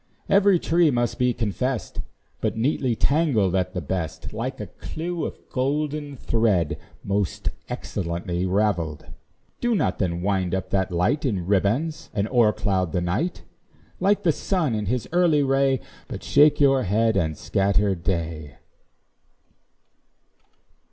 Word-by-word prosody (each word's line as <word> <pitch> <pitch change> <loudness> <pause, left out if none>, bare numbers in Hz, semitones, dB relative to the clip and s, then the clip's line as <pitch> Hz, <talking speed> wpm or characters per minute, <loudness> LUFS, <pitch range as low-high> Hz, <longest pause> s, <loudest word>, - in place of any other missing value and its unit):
Every 200 -1 +5
tress 165 -1 +3
must 120 -2 -1
be 125 0 +3
confess'd 120 +2 -2 0.4
But - - -1
neatly 125 0 +1
tangled 135 - +2
at 90 -1 0
the 90 - -1
best, 80 +1 -4
Like - - -4
a - - -4
clew 170 +1 -5
of - - -8
golden 145 +2 -2
thread, 105 -10 +1 0.2
Most 100 -1 -1 0.2
excellently 90 0 -3
ravelled. 90 -6 0 0.5
Do 240 -1 +1
not - - 0
then 85 -2 -1
wind 95 -2 0
up 95 0 -4
that 95 -2 +1
light 90 - +1
In 100 - -1
ribands, 110 - 0
and 100 0 +1
o'ercloud 100 -7 +2
the 90 - +1
night; 95 - -2 0.6
Like 200 +2 +2
the 165 - +4
sun 160 - -1
in 105 -2 -2
his 125 +2 -1
early 170 -4 +3
ray, 135 -1 +2 0.3
But - - -7
shake 150 +1 +5
your 135 -2 +4
head 110 +2 +2
and 80 -3 0
scatter 100 0 +1
day. 85 -4 -3
110 Hz, 135 wpm, -24 LUFS, 95-145 Hz, 0.6 s, Every